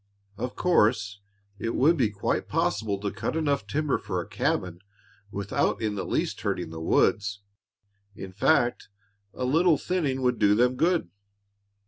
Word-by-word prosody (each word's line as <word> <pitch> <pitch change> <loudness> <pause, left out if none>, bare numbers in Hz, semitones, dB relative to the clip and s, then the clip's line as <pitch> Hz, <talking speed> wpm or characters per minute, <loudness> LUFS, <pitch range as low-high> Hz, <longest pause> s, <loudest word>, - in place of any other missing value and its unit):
"Of 125 +4 -5
course, 105 - +2 0.4
it 115 - -2
would 155 +6 +4
be 125 -8 +2
quite 100 -2 -2
possible 100 -3 0
to 100 -1 -2
cut - - -3
enough 145 -9 0
timber 145 +5 0
for - - -3
a - - -4
cabin 90 -1 -1 0.5
without 100 0 -1
in 110 -2 -1
the 100 - -3
least - - -2
hurting 80 - -2
the 80 0 -7
woods; 100 +4 +1 0.7
in 95 -1 -8
fact 120 +4 +1 0.4
a 130 - -4
little 160 +4 +3
thinning 145 -8 -1
would 125 -3 +1
do 105 -1 +4
them 125 +3 +3
good." 165 - +1
115 Hz, 150 wpm, -26 LUFS, 100-145 Hz, 0.7 s, would